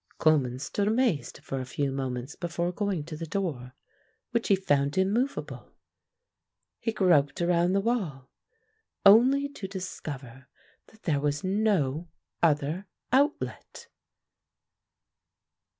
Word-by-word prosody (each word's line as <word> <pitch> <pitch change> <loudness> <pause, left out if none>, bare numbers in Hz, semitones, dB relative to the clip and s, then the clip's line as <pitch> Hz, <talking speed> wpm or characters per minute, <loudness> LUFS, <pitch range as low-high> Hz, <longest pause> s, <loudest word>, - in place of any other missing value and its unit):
Coleman 140 -6 +3
stood 200 +9 -2
amazed 220 - 0
for 135 -3 -4
a - - -3
few 140 +2 -2
moments 130 0 -4
before 170 0 -2
going 195 -4 -2
to 155 +1 -7
the 165 +2 -6
door, 145 -9 -3 0.6
which 235 -1 0
he 200 - +5
found 145 -5 +1
immovable. 225 +9 -1 1.0
He 225 - -1
groped 170 -9 +3
around 175 +1 +2
the 195 - +2
wall 180 - -2 0.7
only 255 +8 +7
to 220 -9 -7
discover 140 - -7 0.4
that 220 - -22
there 150 -5 +1
was 145 0 -1
no 185 -6 +1 0.3
other 155 +4 +1 0.2
outlet. 280 +4 0
170 Hz, 115 wpm, -28 LUFS, 140-200 Hz, 1.0 s, only